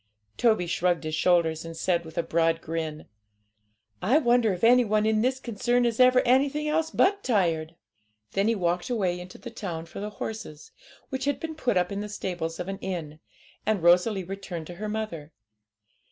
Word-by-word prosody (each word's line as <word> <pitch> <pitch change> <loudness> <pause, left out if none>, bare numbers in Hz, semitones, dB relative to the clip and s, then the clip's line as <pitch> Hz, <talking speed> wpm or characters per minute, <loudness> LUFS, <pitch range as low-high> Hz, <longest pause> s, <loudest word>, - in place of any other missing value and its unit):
Toby 220 -6 +2
shrugged 175 0 0
his 155 0 -4
shoulders, 165 -1 +2
and 165 0 -8
said, 170 0 0
with 160 - -12
a 170 - +1
broad 165 0 +1
grin 160 -2 -4 1.0
'I 245 +10 +4
wonder 240 -6 +3
if 180 +1 -5
any 245 +2 +6
one 215 -1 +1
in 215 0 +2
this 260 +2 +1
concern 240 +1 0
is 235 0 -1
ever 255 0 +6
anything 280 +4 +2
else 315 +1 +1
but 400 +4 +2
tired!' 170 -8 0 0.6
Then 195 +2 +1
he 230 - +2
walked 175 +2 -1
away 190 -7 0
into 180 +1 -10
the 240 - -9
town 175 -7 -5
for - - -9
the 205 +1 -4
horses, 210 -7 -7 0.4
which 265 -1 -3
had 285 0 0
been 320 0 -5
put 250 -10 0
up 180 +2 +1
in 200 - -3
the 210 - -5
stables 175 -5 -4
of 180 - -4
an 195 0 -5
inn, 160 -5 -5 0.4
and 210 -5 0
Rosalie 180 +3 +4
returned 185 -3 -6
to 175 - -9
her 215 - -2
mother. 210 -9 -5
195 Hz, 190 wpm, -27 LUFS, 170-240 Hz, 1.0 s, any